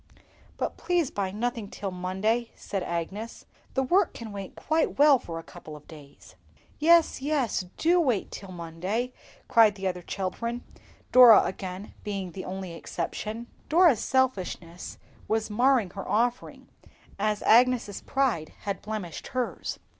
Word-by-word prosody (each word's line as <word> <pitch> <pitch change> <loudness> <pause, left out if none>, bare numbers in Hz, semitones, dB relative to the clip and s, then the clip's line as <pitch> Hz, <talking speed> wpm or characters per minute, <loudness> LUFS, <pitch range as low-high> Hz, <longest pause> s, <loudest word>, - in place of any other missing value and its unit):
"But - - -3
please 345 -6 0
buy 195 -2 -2
nothing 225 +1 -3
till 195 -1 -5
Monday," 190 +6 -1
said 195 - -4
Agnes; 180 +7 -5 0.3
"the 265 - +2
work 355 +7 +2
can 225 -2 -7
wait 200 -1 -7
quite 315 +1 0
well 285 -2 +6
for 165 -7 -7
a 165 - -7
couple 155 -1 -11
of 150 - -14
days." 145 -4 -14 0.5
"Yes, 335 -2 +4
yes, 270 -9 0
do 345 +2 +3
wait 255 - 0
till 195 -1 -8
Monday," 185 +8 -3 0.3
cried 220 -3 +5
the 190 -1 -3
other 180 -1 -3
children; 230 +7 -4 0.5
Dora 245 -4 +9
again 190 +1 -6
being 195 -3 -4
the 185 +2 -7
only 185 -2 -5
exception. 215 +6 -5 0.2
Dora's 325 - +5
selfishness 185 -9 -1 0.3
was 220 0 -1
marring 240 -3 +3
her 195 - -7
offering, 240 +3 -1 0.5
as 210 0 0
Agnes's 240 -3 +4
pride 250 - -1
had 200 -2 -4
blemished 210 -6 -5
hers. 255 -2 -3
215 Hz, 140 wpm, -27 LUFS, 185-255 Hz, 0.5 s, Dora